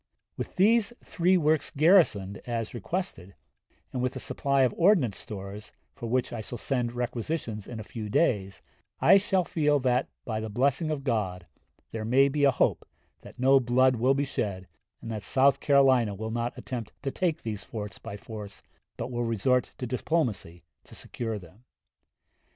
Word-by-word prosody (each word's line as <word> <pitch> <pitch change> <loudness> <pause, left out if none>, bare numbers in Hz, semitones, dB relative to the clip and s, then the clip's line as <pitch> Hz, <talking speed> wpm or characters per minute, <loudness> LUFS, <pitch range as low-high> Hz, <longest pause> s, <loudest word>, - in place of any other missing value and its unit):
With - - -6
these 220 +4 +4
three 180 +2 +2
works 155 -2 +2
garrisoned 140 - +3
as 115 -2 -3
requested, 120 - -4 0.6
and 125 - -2
with 125 +1 -1
a - - -4
supply 140 -1 +1
of 125 - +2
ordnance 165 - +3
stores, 100 0 -8 0.2
for 115 - -6
which 125 +1 0
I 115 - -4
shall 120 +3 -6
send 120 0 -1
requisitions 120 -2 -3
in 115 - -7
a - - -5
few 105 0 -7
days, 100 - 0 0.4
I - - +7
shall 190 -2 +1
feel 150 -3 +1
that, 125 0 +1 0.2
by 110 -3 -2
the 110 0 -4
blessing 140 +8 +1
of 150 -3 -2
God, 100 -9 -1 0.5
there 110 -1 -4
may 135 +5 +4
be 145 +1 +2
a - - +6
hope 130 - +1 0.4
that - - -14
no 135 +2 +5
blood 130 +1 +3
will 130 +4 +3
be 140 +1 0
shed, 95 -8 -3 0.4
and 115 - -5
that 110 -2 -4
South 135 +5 +3
Carolina 130 -7 +4
will 110 +2 -5
not 120 +1 -2
attempt 120 -4 -6
to 135 - -1
take 170 -1 -1
these 105 -3 -4
forts 105 -2 -7
by 100 - -7
force, 105 -2 -9 0.3
but 125 - -4
will 120 0 -1
resort 120 +2 +1
to 125 - -4
diplomacy 120 - -2 0.2
to - - -12
secure 115 -3 -4
them. 95 +4 -15
125 Hz, 175 wpm, -28 LUFS, 110-140 Hz, 0.6 s, I